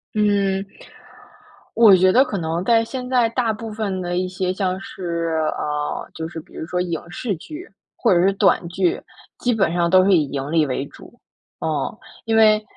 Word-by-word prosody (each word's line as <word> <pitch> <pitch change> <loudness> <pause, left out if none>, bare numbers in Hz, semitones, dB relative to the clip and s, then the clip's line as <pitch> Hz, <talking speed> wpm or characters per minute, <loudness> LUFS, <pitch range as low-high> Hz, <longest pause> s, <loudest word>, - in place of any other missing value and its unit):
嗯， 200 -2 +1 1.1
我 220 -4 +7
觉 185 +1 +4
得 255 - +6
可 215 - -4
能 165 +1 -2
在 230 +1 +3
现 250 +2 -6
在 250 -3 +3
大 235 -1 0
部 220 +1 -7
分 205 -3 -3
的 175 0 -3
一 185 0 -1
些 185 0 -2
像 185 -1 -2
是 170 -4 -3 0.2
呃， 150 0 -3
就 160 0 -5
是 170 - -8
比 - - -19
如 - - -6
说 180 +1 -2
影 170 -3 -3
视 205 +4 -3
剧， 310 - -10 0.3
或 230 - +2
者 175 - +3
是 190 - +4
短 195 -3 +2
剧， 350 - 0 0.4
基 245 -1 0
本 195 -6 +1
上 175 0 +1
都 185 +1 +5
是 200 - +3
以 160 -4 +3
盈 140 +1 -4
利 160 -2 +3
为 135 0 -2
主。 240 - -16 0.4
嗯， - - -2 0.3
因 225 0 +1
为 215 -1 +5
190 Hz, 205 characters per minute, -21 LUFS, 170-220 Hz, 1.1 s, 我